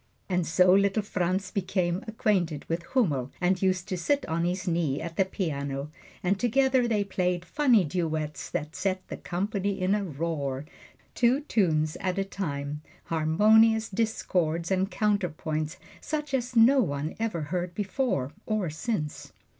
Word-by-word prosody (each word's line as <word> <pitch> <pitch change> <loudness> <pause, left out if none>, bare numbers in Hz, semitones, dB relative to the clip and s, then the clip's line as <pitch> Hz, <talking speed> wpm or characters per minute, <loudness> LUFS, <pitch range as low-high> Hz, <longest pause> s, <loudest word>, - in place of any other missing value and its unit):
And 180 -3 0
so 180 +2 +5
little 200 +2 +3
Franz 185 0 -1
became 185 -2 -1
acquainted 185 -9 0
with 165 +1 -1
Hummel 145 - +1
and 180 +1 +1
used 185 -2 +1
to 185 - -1
sit 280 - +1
on 165 +1 0
his 185 +2 -2
knee 165 -5 0
at 170 0 -6
the 190 - +3
piano, 140 -6 -3 0.3
and 190 +2 +1
together 260 +1 +3
they 215 -3 +1
played 180 -3 -1
funny 245 - +4
duets 155 -2 -2
that 155 +2 -4
set 185 -1 -2
the - - -5
company 200 +2 -2
in 185 +2 +2
a 210 -1 +1
roar 145 -4 -3 0.5
two 250 +4 +3
tunes 160 - +1
at 185 0 -1
a 195 - 0
time, 150 -7 -4 0.2
harmonious 215 +8 +4
discords 180 -6 0
and 190 +1 +1
counterpoint, 175 -6 -1 0.2
such 300 -2 -3
as 250 -1 -1
no 240 +5 +6
one 145 - -2
ever 220 -7 -1
heard 180 -1 -2
before, 200 - -1 0.2
or 210 -7 0
since. 155 -3 -4
185 Hz, 150 wpm, -27 LUFS, 160-210 Hz, 0.5 s, no